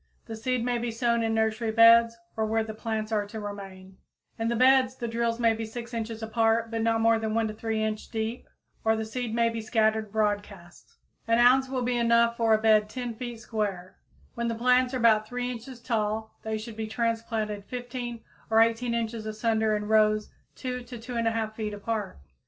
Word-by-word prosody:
The 225 - -6
seed 240 +2 -1
may 245 -1 0
be 240 0 -2
sown 235 0 +1
in 225 0 0
nursery 220 +1 0
beds 230 +1 +6 0.2
or 220 -1 0
where 225 +1 +1
the 220 0 -6
plants 220 0 -3
are 210 -2 0
to 220 +2 -7
remain. 195 -2 -8 0.4
In 225 - 0
the 235 - 0
beds, 260 +1 +4
the 240 -2 -4
drills 230 0 -1
may 230 -1 +4
be 225 0 -4
6 235 +2 -7
inches 225 -1 -4
apart, 225 0 +1
and 225 0 -1
not 225 0 +2
more 225 0 +4
than 220 0 -2
1 225 -1 0
3 220 0 -2
inch 215 0 -3
deep, 225 +1 -4 0.4
or 220 0 +3
the 220 0 -3
seed 230 0 -4
may 235 0 +3
be 230 0 -4
scattered 220 -1 +1
broadcast. 205 -4 -3 0.3
An 230 0 +3
ounce 255 +2 +5
will 260 -2 -2
be 245 0 0
enough 235 0 +3
for 230 -1 +1
a - - +2
bed 215 -1 +3
10 245 0 -4
feet 235 0 -7
square. 200 -5 -4 0.3
When 235 0 -2
the 230 - -1
plants 250 +2 +3
are - - +1
about 220 -3 +4
3 245 +1 -3
inches 245 +1 -8
tall 220 -2 -2
they 220 0 -3
should 220 +1 -8
be 220 0 -4
transplanted 225 -2 -2
15 245 -1 -6 0.3
or 225 0 +4
18 230 +1 +2
inches 225 -1 -3
asunder 220 0 +1
in 210 0 -3
rows 215 -1 +3 0.2
2 250 -1 -4
to 245 0 -9
2 230 +2 -8
1/2 225 -2 -1
feet 215 -1 -4
apart. 210 - -4
225 Hz, 205 wpm, -27 LUFS, 220-235 Hz, 0.4 s, beds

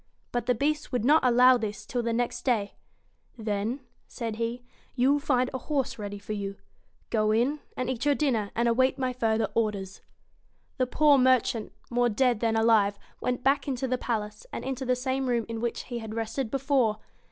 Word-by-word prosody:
But 240 -1 -2
the 250 - +3
Beast 295 +5 -1
would 245 -3 -1
not 305 +4 +5
allow 250 +1 +6
this 215 -3 -5
till 245 - -2
the 230 0 -1
next 240 +1 -1
day. 220 -6 0 0.6
'Then,' 220 +4 -2 0.3
said 225 -3 -5
he, 235 +2 -3 0.3
'you 260 +2 +3
will 290 - +1
find 255 -4 +1
a 260 - -2
horse 275 -4 -2
ready 205 -1 -5
for 200 +1 -6
you. 200 -1 -4 0.6
Go 215 -2 +2
in, 245 +7 +2 0.2
and 255 - -2
eat 250 -2 -2
your 290 -1 +4
dinner, 235 -9 0
and 235 +1 +2
await 260 +3 +3
my 255 -1 -1
further 225 -3 +1
orders.' 200 -4 -2 0.8
The 255 - +2
poor 290 +1 +4
merchant, 250 -3 +2 0.2
more 245 0 +2
dead 240 0 +2
than 225 -1 +1
alive, 220 -3 +3 0.2
went 250 0 -2
back 275 +2 +2
into 265 -1 -1
the 255 0 -1
palace, 210 -3 -3
and - - -5
into 265 -1 -3
the 250 - +3
same 260 +1 -1
room 235 -2 +1
in 225 -1 -5
which 235 -1 -2
he 240 -1 -5
had 220 -1 -7
rested 225 +2 -2
before. 265 -4 +1
240 Hz, 195 wpm, -27 LUFS, 220-260 Hz, 0.8 s, allow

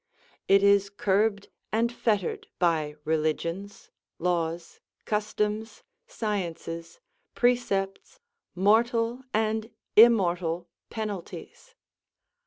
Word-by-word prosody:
It 195 0 +5
is 200 0 +4
curbed 200 +1 0 0.2
and 235 +2 +1
fettered 210 -6 -1
by 155 -4 +1
religions, 160 +5 -2 0.3
laws, 170 -1 -2 0.3
customs, 210 +1 -2 0.2
sciences, 175 - -4 0.4
precepts, 240 - 0 0.4
mortal 230 +5 +2
and 220 0 0 0.3
immortal 180 -7 +4 0.2
penalties. 210 -5 -7
200 Hz, 70 wpm, -27 LUFS, 175-220 Hz, 0.4 s, It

